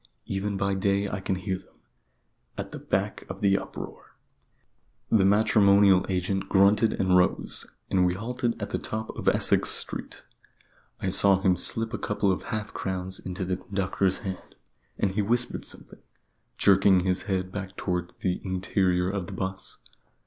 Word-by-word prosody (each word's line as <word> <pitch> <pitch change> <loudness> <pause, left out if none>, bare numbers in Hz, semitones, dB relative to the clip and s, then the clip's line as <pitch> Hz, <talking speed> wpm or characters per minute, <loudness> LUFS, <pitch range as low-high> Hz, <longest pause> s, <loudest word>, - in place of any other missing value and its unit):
Even 100 +1 -2
by 100 0 0
day 100 +1 +1
I 100 - -4
can 95 0 -2
hear 95 0 -3
them, - - -24 0.8
at - - -5
the - - -7
back - - -2
of - - -7
the 100 -1 +4
uproar - - -9 0.5
" - - -45 0.3
The 100 -4 +4
matrimonial 100 -2 +5
agent 95 +1 -1
grunted 100 +3 +4
and 95 -1 +2
rose, 90 0 +1 0.2
as 95 - +2
we 90 -1 +3
halted 120 +2 -3
at 105 - -5
the - - -1
top 110 0 -4
of - - -8
Essex - - +4
Street. - - 0 0.8
I 95 - 0
saw 95 0 +4
him 95 -2 +3
slip 115 +6 0
a 115 - -3
couple 105 -1 0
of 90 - -2
half 110 -2 -4
crowns 95 0 -4
into 95 0 -5
the 90 0 -1
conductor's 95 0 -1
hand: 95 -1 -7 0.4
and 100 - 0
he 105 +2 0
whispered 120 +4 0
something, - - -10 0.6
jerking 100 -1 +5
his 90 0 +1
head 95 -1 -1
back 95 -1 -6
towards 90 -2 -3
the 90 -2 -2
interior 95 -1 0
of 95 -2 -3
the 100 - -7
'bus. 95 0 -5
95 Hz, 165 wpm, -26 LUFS, 95-100 Hz, 0.8 s, matrimonial